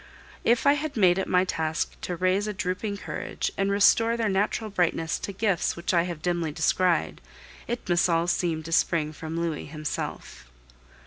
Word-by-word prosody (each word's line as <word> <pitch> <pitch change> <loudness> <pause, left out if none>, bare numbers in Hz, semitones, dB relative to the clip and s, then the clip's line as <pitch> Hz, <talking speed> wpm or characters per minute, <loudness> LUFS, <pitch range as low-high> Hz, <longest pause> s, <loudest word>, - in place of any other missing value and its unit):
If 235 +1 +2
I 280 - +7
have 295 -2 -3
made 185 -3 +4
it 190 - -2
my 180 0 +3
task 160 -2 -1
to 180 - -3
raise 185 +4 +1
a 210 - -2
drooping 200 +2 -2
courage - - -4
and 195 0 0
restore 225 +3 +4
their 225 -2 0
natural 205 +2 0
brightness 165 -4 0
to - - -5
gifts 195 -2 0
which 170 +2 -2
I 170 -1 +3
have 165 -2 -7
dimly 175 -3 0
descried, 170 +3 +1 0.5
it 240 +1 -4
must 175 0 +3
all 165 0 +2
seem 170 -2 0
to 165 - -8
spring 160 -2 +1
from 160 +2 -5
Louis 165 -3 -3
himself. 145 - -6
180 Hz, 180 wpm, -26 LUFS, 165-200 Hz, 0.5 s, I